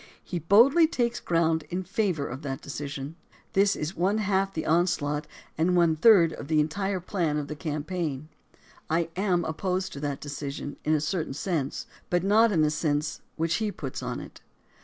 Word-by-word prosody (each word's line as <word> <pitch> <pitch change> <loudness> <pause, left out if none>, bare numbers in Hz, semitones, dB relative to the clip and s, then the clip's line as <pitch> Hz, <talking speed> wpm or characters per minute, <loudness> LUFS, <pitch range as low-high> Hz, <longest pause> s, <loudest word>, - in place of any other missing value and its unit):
He 175 - -4
boldly 240 - +6
takes 240 -6 -1
ground 165 -2 +1
in 180 +1 -2
favor 185 -6 -1
of 130 +3 -6
that 135 -3 -4
decision. 140 +1 -6 0.4
This 195 0 +4
is 155 +5 -4
one 190 +5 +1
half 195 -2 +1
the 160 -4 -4
onslaught, 150 -3 +1 0.3
and 180 +3 +3
one 170 -2 +4
third 170 -2 +6
of - - -8
the 155 0 +2
entire 190 +6 0
plan 170 -4 -1
of 145 -1 -3
the 150 - -5
campaign. 155 -1 -3 0.6
I 165 +1 +1
am 180 -3 +1
opposed 185 +4 -2
to 140 - -7
that 145 -1 -3
decision 145 0 -6
in 155 +1 +2
a 150 - 0
certain 155 -3 -2
sense, 150 -4 -2 0.2
but 175 0 +1
not 215 +3 +5
in 165 -5 +2
the 150 - +2
sense 155 0 -1
which 165 +1 0
he 215 -2 -1
puts 135 -8 -6
on - - -4
it. - - -11
165 Hz, 180 wpm, -27 LUFS, 150-190 Hz, 0.6 s, boldly